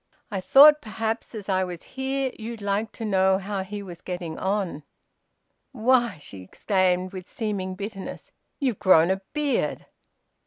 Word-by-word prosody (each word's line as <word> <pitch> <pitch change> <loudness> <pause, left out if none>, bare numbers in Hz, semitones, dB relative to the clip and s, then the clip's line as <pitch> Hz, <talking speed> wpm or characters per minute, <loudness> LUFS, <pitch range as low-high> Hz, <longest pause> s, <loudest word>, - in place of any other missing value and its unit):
"I 195 -2 -2
thought 295 +8 +8
perhaps 225 +1 -4
as 210 -3 -7
I 190 -1 +1
was 180 -2 -6
here 265 0 -1
you'd 225 +1 -6
like 205 +2 -1
to 225 - -6
know 190 -2 +3
how 195 0 -3
he 200 +2 -6
was 175 -3 -10
getting 175 -3 -5
on." 190 -5 -1 0.9
"Why," 240 -4 +2
she 100 -9 -10
exclaimed, 185 - 0
with 185 -1 -8
seeming 195 -4 -3
bitterness, 200 0 -7 0.3
"you've 260 -8 -1
grown 180 -2 +5
a 190 0 -1
beard!" 295 -2 -1
200 Hz, 150 wpm, -25 LUFS, 185-225 Hz, 0.9 s, thought